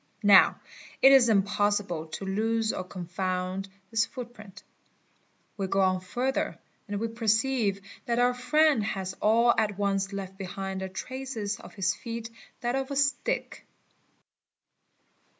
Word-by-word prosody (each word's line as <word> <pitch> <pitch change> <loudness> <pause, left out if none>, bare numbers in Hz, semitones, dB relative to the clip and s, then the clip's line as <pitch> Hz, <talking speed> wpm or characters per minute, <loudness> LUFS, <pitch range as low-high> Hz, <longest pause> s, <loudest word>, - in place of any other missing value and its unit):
Now 205 -2 +7 0.4
it 270 - +9
is 260 -4 +7
impossible 205 -4 +1
to 160 +5 -6
lose 220 +3 0
or - - -3
confound 185 +1 -3 0.2
this 225 0 +3
footprint. 230 -5 -9 0.9
We 195 -2 -2
go 195 - 0
on 185 -1 +2
further 250 +8 -2 0.3
and 205 -1 -3
we 230 - -1
perceive 225 -2 +1 0.3
that 235 -1 0
our 245 +1 +3
friend 250 0 +3
has 190 -3 -3
all 235 +3 +4
at 210 -3 0
once 195 -1 0
left 195 -1 -6
beside 190 0 -4
the 190 0 -4
traces 225 -1 -5
of - - -13
his 195 -1 +1
feet 230 -1 -6 0.3
that 240 +1 -1
of 270 0 -2
a 280 - -3
stick. 280 0 -1
205 Hz, 135 wpm, -28 LUFS, 195-240 Hz, 0.9 s, it